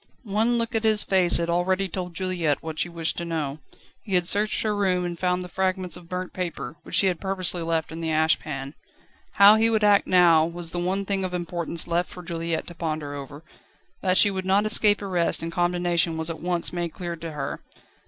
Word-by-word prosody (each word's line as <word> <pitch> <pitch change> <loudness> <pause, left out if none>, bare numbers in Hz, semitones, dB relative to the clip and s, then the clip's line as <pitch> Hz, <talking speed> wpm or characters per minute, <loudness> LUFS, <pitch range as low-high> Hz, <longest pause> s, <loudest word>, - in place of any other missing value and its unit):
One 225 +3 +1
look 230 +1 -1
at 225 0 0
his 215 -1 +4
face 185 -3 +3
had 170 - -1
already 185 +3 0
told 180 -1 -6
Juliette 175 -6 -1
what 160 -1 -6
she 175 - 0
wished 170 -1 -2
to 170 - -3
know. 155 -4 -3 0.4
He 195 -4 -2
had 175 -1 +3
searched 210 +3 +1
her 215 -1 0
room, 185 -3 +1
and 175 -1 -5
found 180 0 0
the - - -7
fragments 185 -1 -1
of 175 -1 -12
burnt 180 0 -5
paper, 175 -3 -5
which - - -6
she - - +3
had 180 -3 0
purposely 185 -2 0
left 165 -1 -1
in 165 - -7
the 165 -1 -3
ash 160 0 +3
pan. 135 -2 -6 0.6
How 200 +2 +7
he 225 +1 +3
would 220 -1 +1
act 205 -1 +4
now 170 -3 +5
was 170 0 -4
the 175 - -3
one 190 +3 -1
thing 195 -1 -1
of 180 -1 -3
importance 170 -1 +1
left 175 +1 0
for 180 - -10
Juliette 165 -1 -3
to 175 - -9
ponder 155 -3 -4
over. 145 +2 -9 0.6
That 185 -1 +2
she 205 - +6
would 190 -1 -3
not 195 +3 +2
escape 210 -1 +2
arrest 180 -4 0
and 165 - -3
condemnation 175 -1 0
was 160 +1 -3
at 160 - -8
once 175 0 0
made 175 -2 -3
clear 175 -2 -5
to 165 -1 -7
her. 140 -2 -4
175 Hz, 220 wpm, -24 LUFS, 165-190 Hz, 0.6 s, How